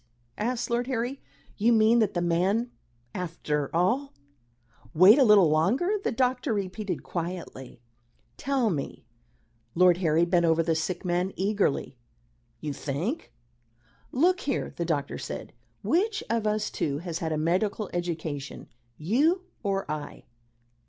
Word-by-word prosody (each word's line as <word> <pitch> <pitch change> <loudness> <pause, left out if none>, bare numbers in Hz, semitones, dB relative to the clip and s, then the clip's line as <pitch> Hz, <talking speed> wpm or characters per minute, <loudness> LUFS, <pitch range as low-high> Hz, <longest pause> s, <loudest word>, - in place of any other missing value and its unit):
asked 235 +2 -2
Lord 240 +1 0
Harry. 255 +1 -2 0.4
"You 225 +3 +3
mean 225 +1 +5
that 215 -4 +1
the 175 - 0
man, 190 +8 +1 0.4
after 155 -5 -3
all 240 +12 +1 0.4
" 120 0 -42 0.3
"Wait 190 - +8
a - - +7
little 210 -8 +6
longer," 245 - +2
the - - 0
doctor 250 0 0
repeated 200 0 -3
quietly. 165 -8 -6 0.5
"Tell 260 -5 0
me" 140 -7 -5 0.7
Lord 180 0 +5
Harry 165 -2 +2
bent 175 0 +2
over 165 0 +3
the 165 0 +1
sick 175 +4 -3
man 180 +2 0
eagerly 200 -5 -1 0.6
"you 150 -2 -3
think 165 - -4 0.4
" 120 0 -40 0.3
"Look 360 +7 +3
here," 275 -3 -2
the 170 - -2
doctor 150 -4 -2
said. - - -7 0.3
"Which 415 +5 +1
of 230 -2 0
us 210 0 -1
two 140 -2 -2
has 165 +1 -5
had 160 -1 -2
a 155 - 0
medical 190 +6 0
education 160 -5 -4 0.3
you, 290 - +2 0.2
or 195 -2 -1
I?" 150 -1 -6
185 Hz, 140 wpm, -27 LUFS, 165-235 Hz, 0.7 s, Wait